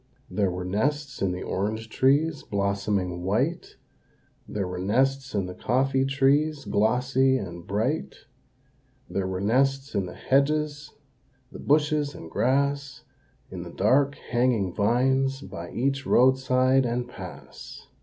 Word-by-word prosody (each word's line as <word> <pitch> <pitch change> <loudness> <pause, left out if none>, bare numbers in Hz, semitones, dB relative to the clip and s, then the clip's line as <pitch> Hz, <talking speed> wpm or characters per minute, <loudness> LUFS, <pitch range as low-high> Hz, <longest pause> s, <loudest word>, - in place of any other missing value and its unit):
There 100 -3 +1
were 90 0 -4
nests 140 +9 -1
in 95 - +1
the 90 0 -4
orange 110 +4 -2
trees, 145 +6 +2
blossoming 100 -3 -1
white, 120 - -1 0.7
There 100 -3 -3
were 90 0 -5
nests 130 +6 0
in 100 -2 0
the 90 - -6
coffee 130 +5 +1
trees, 140 +2 +2
glossy 125 +5 +2
and 85 -6 -7
bright, 115 +10 -1 0.9
There 95 -1 -2
were 95 0 -3
nests 135 +5 +1
in 95 -2 -1
the - - -9
hedges, 150 +2 0 0.6
the - - -10
bushes 150 0 +1
and 80 - -10
grass, 140 +2 0 0.5
In - - -6
the - - -8
dark, 140 +2 +2
hanging 120 -7 0
vines, 130 +5 +1
by 85 -9 -8
each 135 +2 -1
roadside 130 +1 +4
and 120 0 -2
pass. - - -10
130 Hz, 130 wpm, -26 LUFS, 100-140 Hz, 0.9 s, roadside